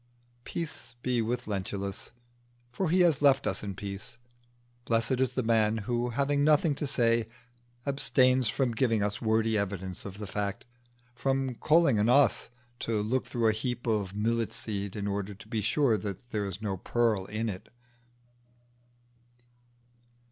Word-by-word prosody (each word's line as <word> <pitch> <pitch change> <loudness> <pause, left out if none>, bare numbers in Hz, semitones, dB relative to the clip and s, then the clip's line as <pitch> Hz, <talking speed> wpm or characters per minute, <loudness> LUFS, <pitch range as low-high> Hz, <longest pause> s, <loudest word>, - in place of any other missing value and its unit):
Peace 135 -7 -5
be 125 -2 +1
with 120 +2 -2
Lentulus, 100 -1 -4 0.6
for 165 +7 -1
he 180 +3 +4
has 170 -6 +4
left 140 -2 +5
us - - -1
in 100 -2 -5
peace. 100 +3 -7 0.7
Blessed 115 +3 +1
is 130 -2 +1
the 130 - 0
man 110 -1 +3
who, 120 +1 0
having 140 +3 +1
nothing 150 +1 +4
to 145 +1 -3
say, 115 -4 +2 0.6
abstains 130 -3 +3
from 125 +3 0
giving 115 -2 +1
us 105 0 -1
wordy 110 0 +2
evidence 95 -2 -3
of 100 -1 -8
the 105 - -5
fact 100 0 -3 0.5
from 135 +1 0
calling 155 -2 +3
on 105 +3 +3
us 140 -1 +4 0.3
to 115 -2 -1
look 115 +5 0
through 120 -2 -1
a - - +5
heap 120 +2 -3
of 105 -4 -1
millet 115 +2 0
seed 100 -3 -4
in 100 -1 -3
order 100 0 -3
to 110 +3 -14
be 110 -1 -2
sure 115 0 +2
that 100 +5 -6
there 105 -2 -1
is 100 +2 -6
no 100 -3 -2
pearl 110 -1 +1
in 110 +2 -2
it. 100 -1 -6
115 Hz, 155 wpm, -29 LUFS, 105-130 Hz, 0.7 s, left